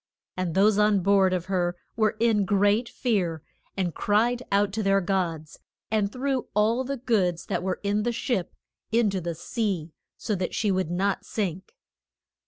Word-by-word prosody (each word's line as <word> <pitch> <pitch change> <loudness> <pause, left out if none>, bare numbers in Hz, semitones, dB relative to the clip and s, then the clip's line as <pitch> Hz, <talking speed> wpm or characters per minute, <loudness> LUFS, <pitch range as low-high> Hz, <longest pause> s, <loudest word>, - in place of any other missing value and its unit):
And 180 -3 -2
those 205 +2 +4
on 210 -2 +4
board 195 0 +4
of 180 -1 -1
her 180 -2 -1 0.2
were 215 -1 +1
in 225 -3 +3
great 205 +4 +2
fear, 180 - -1 0.3
and 180 -3 -1
cried 235 +4 +1
out 200 0 +2
to 220 - -1
their 195 -1 +3
gods, 175 -5 -2 0.3
and 210 -2 +1
threw 265 +1 -2
all 225 +4 +2
the 275 +2 -3
goods 190 -9 0
that - - -2
were 185 0 -2
in 205 +1 +1
the 240 +3 0
ship 230 -5 -2 0.4
in 225 -2 +3
to 190 -1 -2
the 170 0 -3
sea, 180 -4 -3 0.2
so 215 - -2
that 185 -2 -2
she 210 -2 +1
would 185 -3 0
not 190 +3 0
sink. 190 -4 -4
200 Hz, 175 wpm, -26 LUFS, 185-220 Hz, 0.4 s, those